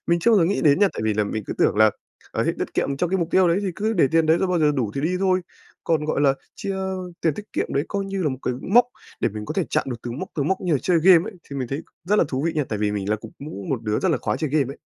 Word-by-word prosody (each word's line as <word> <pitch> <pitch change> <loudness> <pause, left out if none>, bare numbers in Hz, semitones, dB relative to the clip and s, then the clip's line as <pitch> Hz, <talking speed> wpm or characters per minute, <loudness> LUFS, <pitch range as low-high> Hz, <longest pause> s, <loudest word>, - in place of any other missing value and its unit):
Mình 170 0 +3
chưa 235 - +3
bao 220 - +6
giờ 170 - +4
nghĩ 195 +5 0
đến 145 0 +5
nha, 205 0 +5
tại - - -5
vì 110 -1 +1
là 105 0 +1
mình 110 +1 -3
cứ - - -3
tưởng - - +3
là, 110 0 +6 0.4
ờ, - - -1
hết - - +1
tiết - - -4
kiệm 140 - 0
trong 175 +4 -1
cái 190 - +1
mục 170 - -1
tiêu 185 -1 +4
đấy 170 +2 +2
thì 195 - -1
cứ 220 +2 0
để 165 -9 +3
tiền 165 -1 +4
đấy 160 +2 +4
rồi 190 - 0
bao 180 -1 +1
giờ 150 -2 +3
đủ 120 -7 -1
thì 135 - -2
đi 175 +5 0
thôi, 185 -1 +2 0.4
còn, 155 -2 +1
gọi 155 - 0
là, 140 -2 +4 0.2
chia 195 - -4 0.5
tiền 160 -3 +1
tiết 210 - -6
kiệm - - -1
đấy 140 - +1
coi 200 -1 -2
như 195 -1 -3
là 155 - +2
một 130 - -4
cái 125 - -1
mốc 235 +5 +5 0.4
để - - +2
mình 105 0 -6
có - - -5
thể 190 - +1
chạm - - +1
được 120 - -3
từng 120 +3 -5
mốc, 190 - -5
từng 145 -1 -1
mốc 190 0 0
như 180 -3 -1
là 145 - +3
chơi 180 -2 +3
game 185 +3 +6
ấy, - - -17 0.2
thì 140 - -5
mình 130 -3 -3
thấy 140 +4 -3 0.2
rất 205 +4 +2
là - - +4
thú 130 +1 -2
vị 165 - +1
nha, 155 -3 0
tại 110 - -2
vì 105 -1 +1
mình 100 -1 -3
là 105 - +2
cũng 110 +1 -12
cũng 140 -9 -7
một 130 -4 -1
đứa 105 -1 0
rất 190 - +1
là 165 - +2
khoái - - -2
chơi 155 -3 -2
game 140 -3 +1
ấy. - - -16
155 Hz, 345 wpm, -23 LUFS, 130-185 Hz, 0.5 s, bao